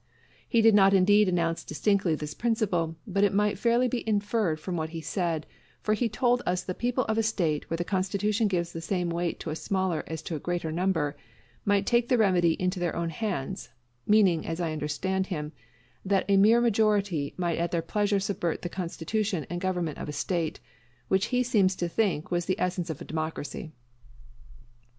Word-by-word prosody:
He 230 -1 +3
did 225 -1 +7
not 195 -1 +6
indeed 205 +2 +5
announce 170 -2 0
distinctly 190 +1 +1
this 150 -1 -5
principle, 190 -8 0
but 200 -2 0
it 200 -1 +3
might 210 0 +1
fairly 240 +1 +3
be 245 0 -2
inferred 205 -5 0
from 180 +3 -4
what 160 -1 -2
he 165 0 -6
said; 165 0 -2 0.4
for 215 - +2
he 230 +2 0
told 245 +2 +2
us 180 0 -1
the 185 - -3
people 245 +4 -1
of 220 0 0
a - - +4
State 175 -9 -1
where 165 - -1
the 175 - -1
constitution 200 +4 0
gives 170 -3 -1
the 165 - -5
same 175 0 -1
weight 170 0 -2
to 160 - -4
a - - -3
smaller 185 -2 -1
as 160 -1 -5
to 165 - -4
a - - -4
greater 175 0 -2
number, 165 -4 0 0.5
might 200 -1 +2
take 240 +1 +2
the 250 - +4
remedy 180 -6 +3
into 185 +1 -1
their 175 -2 -1
own 170 -1 -2
hands; 165 - -4 0.4
meaning, 195 -7 +4
as 165 +1 -4
I 170 -2 -1
understood 185 +6 -1
him, 150 -5 -4 0.5
that 195 0 +1
a 200 - +4
mere 215 +4 +6
majority 205 -9 +1
might 175 -3 -1
at 170 0 0
their 170 -1 -1
pleasure 205 +3 +1
subvert 190 -4 -2
the 175 - -3
constitution 180 0 -2
and 175 0 -3
government 180 -5 -2
of - - -5
a - - -4
State, 165 0 -2 0.5
which 190 +1 +2
he 250 0 +1
seemed 215 -6 +3
to 175 - -1
think 175 -4 -1
was 175 -1 0
the 185 - 0
essence 180 -1 -1
of 155 - -5
democracy. 155 0 -4
185 Hz, 195 wpm, -28 LUFS, 165-210 Hz, 0.5 s, did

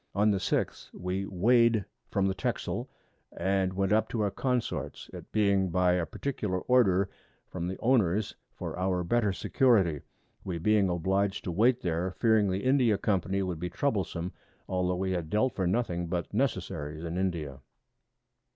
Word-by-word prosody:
On 105 +1 +4
the 100 - +1
6th - - -2
we 95 +2 -3
weigh'd 115 +2 +3 0.2
from 100 -1 +1
the 95 - +1
Texel, 85 - -3 0.5
and 95 -1 +1
went 95 +1 0
up 110 - +2
to 115 - -2
our 100 -1 +1
Consorts, 125 +2 -2
it - - -10
being 100 -3 +2
by 90 +1 +3
a 90 -2 0
particular 105 -9 -3
Order 100 -7 +3 0.4
from 85 - -4
the 95 - -4
Owners 110 -5 +2 0.2
for - - -6
our 90 -1 0
better 105 +3 +1
Security; 95 - +2 0.4
we 90 -3 -3
being 100 +3 +3
oblig'd 95 +3 0
to 90 - -3
wait 120 +8 +3
there, 90 +2 -2
fearing 110 -4 +3
the 95 +1 -2
India 130 -5 +3
Company 95 -1 0
would 90 -4 -3
be 90 +1 -3
troublesome, 95 -5 -1 0.4
altho' 90 -1 0
we 95 +1 -1
had 85 -4 -2
dealt 110 +6 +1
for 95 -2 -1
nothing 90 -4 -1
but 85 +2 -3
Necessaries 85 - -2
in 85 0 -4
India. 85 -7 -2
95 Hz, 160 wpm, -29 LUFS, 90-110 Hz, 0.5 s, On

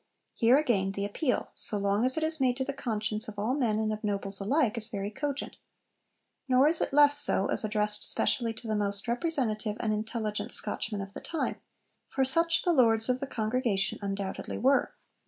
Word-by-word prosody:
Here, 240 +3 +4
again, 200 -10 0
the 200 0 -3
appeal, 250 +6 -2
so 210 - -2
long 200 +2 0
as 260 +3 +2
it 315 - 0
is 315 0 0
made 250 -1 +1
to 265 - -1
the 280 - -4
conscience 215 -4 -3
of 210 -1 -9
all 215 +5 -1
men 240 -7 0
and 215 0 -1
of 215 - -7
nobles 200 -1 -3
alike, 245 +2 +1
is 225 -2 -3
very 205 -3 -5
cogent. 280 +3 -5 0.9
Nor 260 +2 +4
is 320 +1 +4
it - - -1
less 290 0 +8
so 200 -8 +5
as - - +2
addressed 210 -1 0
specially 235 -2 0
to 230 - -9
the 215 - -1
most 200 +1 -3
representative 235 -6 0
and 215 -1 -1
intelligent 215 0 -4
Scotchmen 210 -3 -1
of 195 0 -9
the - - -8
time, 325 - -3 0.5
for 265 - 0
such 335 +5 +2
the 350 - +2
Lords 225 -4 +3
of 250 0 +1
the 275 - -4
Congregation 220 -4 -1
undoubtedly 195 -1 -4
were. 270 +3 +1
225 Hz, 195 wpm, -28 LUFS, 210-265 Hz, 0.9 s, less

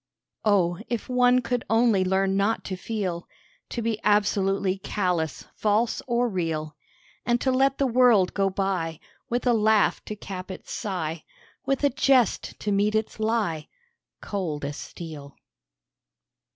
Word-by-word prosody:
Oh! 180 -5 +2
if 235 -3 -3
one 250 0 +4
could 245 0 -1
only 225 -3 +4
learn 190 +1 +1
not 200 +3 +1
to 190 - -4
feel; 185 -3 -4 0.4
To 235 - -3
be 225 -1 -1
absolutely 195 -2 +2
callous, 180 -6 -2
false 220 +2 +1
or 240 0 +2
real; 160 -6 -3 0.5
And 240 0 +1
to 260 - +2
let 270 +1 +2
the 275 - +2
world 240 -6 +4
go 195 -1 +1
by, 185 -5 -2 0.3
With 245 +2 -1
a 245 - +4
laugh 220 -1 +3
to 215 - -5
cap 190 -2 -7
its 190 - -8
sigh, 170 -7 -3 0.4
With 275 +1 0
a 285 - +4
jest 265 -4 +2
to 210 - -1
meet 205 +2 +2
its 220 +1 -2
lie, 215 -8 0 0.5
Cold 165 -8 -3
as 145 +1 -5
steel. 150 -5 -9
205 Hz, 145 wpm, -25 LUFS, 185-235 Hz, 0.5 s, one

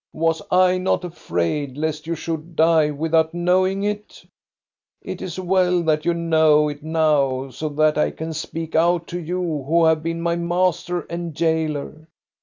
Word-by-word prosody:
"Was 165 0 0
I 185 0 +4
not 185 0 0
afraid 140 - -3
lest 155 0 -3
you 170 - -1
should 165 0 -5
die 160 -1 +4
without 160 +2 0
knowing 185 +3 +1
it? 210 0 -4 0.8
It - - -6
is 185 0 -5
well 180 -1 +2
that 155 -2 +1
you 170 0 +2
know 160 -2 +3
it 145 0 -7
now, 145 -4 +1
so 155 +4 -4
that 150 +1 +2
I - - +2
can 160 0 -6
speak 160 +1 -5
out 170 +1 +2
to 175 - -4
you 170 -3 -3
who 165 +2 +3
have 160 -1 +3
been 165 +1 -3
my 170 0 0
master 175 0 0
and 170 -1 -6
jailer. 160 -1 -2
165 Hz, 165 wpm, -21 LUFS, 155-175 Hz, 0.8 s, I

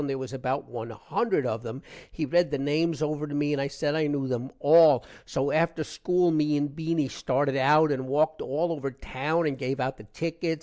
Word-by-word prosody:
there 135 -1 -2
was 130 0 -6
about 135 +1 -2
1 115 -1 -6
hundred 145 - -1
of 110 -2 -2
them. 120 +3 -7 0.3
he 155 - -3
read 175 +5 +2
the 145 - -1
names 150 +4 0
over 150 0 -2
to 145 - -5
me 145 0 +1
and 140 - 0
i 140 - -1
said 145 +1 -2
i 155 -1 +1
knew 145 -2 -1
them 125 0 -3
all. 150 -4 +6 0.2
so 135 +2 -1
after 165 0 +1
school 180 +3 +1
me 150 -1 +2
and 145 -1 -2
Beany 160 -2 0
started 135 +2 -1
out 150 +3 +4
and 130 -2 -2
walked 155 +3 +1
all 160 +6 -1
over 140 -4 -3
town 140 +5 -2
and 140 -3 -2
give 135 +1 -2
out 130 +1 -2
the 105 - -13
tickets. 165 - -3
145 Hz, 220 wpm, -27 LUFS, 135-160 Hz, 0.3 s, all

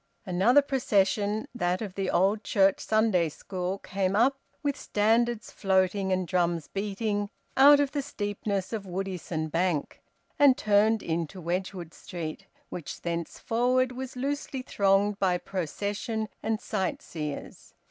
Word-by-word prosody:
Another 210 +10 +4
procession 210 -5 +1
that 180 -5 0
of 205 -4 -5
the 195 -1 -2
Old 200 +4 +2
Church 195 -1 +3
Sunday 215 -7 +2
school 185 +4 -4
came 195 0 -1
up, 265 +5 +3 0.2
with 285 -1 0
standards 225 +2 +1
floating 190 0 +1
and 185 -1 0
drums 170 -2 0
beating, 205 +1 -2 0.3
out 285 +2 +8
of 285 -1 +1
the 290 - -1
steepness 205 -6 -3
of 205 -3 -4
Woodisun 180 -4 -3
Bank, 170 -3 -1 0.4
and 280 -3 +6
turned 215 +1 +3
into 170 +2 -3
Wedgwood 175 -1 -3
Street, 165 -3 -7 0.2
which 170 - -7
thenceforward 235 +9 0
was 255 +1 -6
loosely 275 0 -3
thronged 200 -1 +2
by 185 -2 +2
procession 205 +5 -3
and 220 0 -1
sightseers. 180 -8 -4
200 Hz, 125 wpm, -28 LUFS, 180-225 Hz, 0.4 s, out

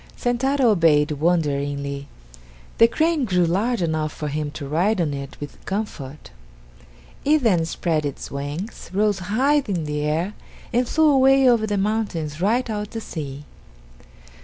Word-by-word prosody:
Sentaro 250 +1 +2
obeyed 155 -6 +3
wonderingly. 140 -3 -1 0.7
The 230 - +8
crane 315 +4 +1
grew 180 -6 +2
large 200 +5 0
enough 155 -2 -1
for 150 0 -5
him 150 +1 -2
to 145 -2 -6
ride 180 +8 +1
on 155 -4 0
it 140 0 -7
with 145 -1 -9
comfort. 155 -9 -5 0.9
It 300 0 +3
then 180 -8 +3
spread 160 -1 -1
its 145 -2 -5
wings, 145 +10 -6
rose 205 0 +2
high 260 +11 +2
in 180 -5 -1
the 150 0 -3
air, 160 +7 -1 0.4
and 245 +1 +2
flew 315 0 +3
away 270 -1 +5
over 230 -3 +4
the 205 -1 -1
mountains 195 -7 -2
right 235 +7 +2
out 210 -2 -3
to 225 - -5
sea. 145 -8 -7
180 Hz, 150 wpm, -22 LUFS, 150-230 Hz, 0.9 s, The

